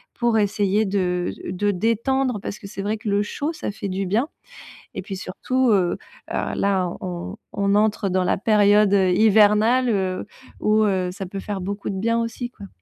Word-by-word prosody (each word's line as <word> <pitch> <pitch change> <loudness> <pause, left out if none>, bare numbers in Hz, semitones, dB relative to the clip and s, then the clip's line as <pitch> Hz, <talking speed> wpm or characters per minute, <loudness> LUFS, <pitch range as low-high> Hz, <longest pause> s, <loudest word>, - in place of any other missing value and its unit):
pour 235 -2 +2
essayer 205 0 +1
de 180 -3 -1 0.2
de 205 +3 0
détendre 230 +5 0
parce 200 - -5
que 220 - -12
c'est 195 - -6
vrai 210 +2 -1
que 220 +1 -9
le 200 0 +2
chaud, 290 +9 -3
ça - - -5
fait 200 -1 -5
du 190 +1 -2
bien 225 +9 +1 0.7
et - - -4
puis 195 - -6
surtout, 250 +7 -1
heu, 185 -4 +2 0.3
alors - - -2
là 190 -3 +1
on 180 +2 -5 0.2
on 200 -1 +1
entre 210 -1 +2
dans 185 0 +1
la - - +1
période, 210 -1 +4
heu, 190 -2 +3
hivernale, 215 +4 +4
heu 190 -3 -1 0.3
où 215 +1 +3
heu, 190 -3 0
ça 195 +1 -6
peut 195 +2 -6
faire 200 -1 -4
beaucoup 200 +2 -4
de 195 - -4
bien 230 +2 +1
aussi, 230 +1 -4
quoi. 205 -5 -11
205 Hz, 190 wpm, -22 LUFS, 190-220 Hz, 0.7 s, période